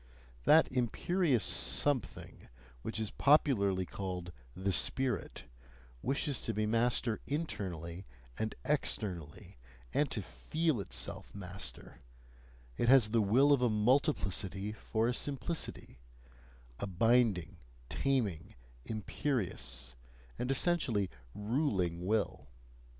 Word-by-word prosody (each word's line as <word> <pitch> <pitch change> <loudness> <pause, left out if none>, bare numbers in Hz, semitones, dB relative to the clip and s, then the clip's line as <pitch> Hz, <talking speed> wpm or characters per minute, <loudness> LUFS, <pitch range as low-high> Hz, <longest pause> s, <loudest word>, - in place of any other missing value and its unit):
That 160 +1 +6
imperious 130 - +1
something 140 -6 +2 0.3
which 110 - -4
is 110 -2 -3
popularly 100 -11 +3
called 90 -2 -5 0.2
"the 95 +1 -1
spirit," 125 +2 +1 0.6
wishes 140 - -1
to 115 - -3
be 110 0 0
master 115 +1 +1
internally 95 - -4 0.3
and 110 - -3
externally, 85 - -2 0.3
and 145 -1 +2
to 105 - -3
feel 160 - -1
itself - - -5
master; 95 -1 -7 0.8
it 120 - +1
has 130 -5 +6
the 115 +1 +2
will 130 +8 +4
of 135 - +2
a 125 - +3
multiplicity 105 - +1
for 110 +1 -1
a 125 - +1
simplicity, 145 - -2 0.8
a - - -3
binding, 105 -3 +2 0.3
taming, 115 - -1 0.3
imperious, 105 - -2 0.5
and 125 - -2
essentially 130 - +1 0.2
ruling 105 - -1
will. 110 -1 -1
110 Hz, 100 wpm, -33 LUFS, 95-135 Hz, 0.8 s, That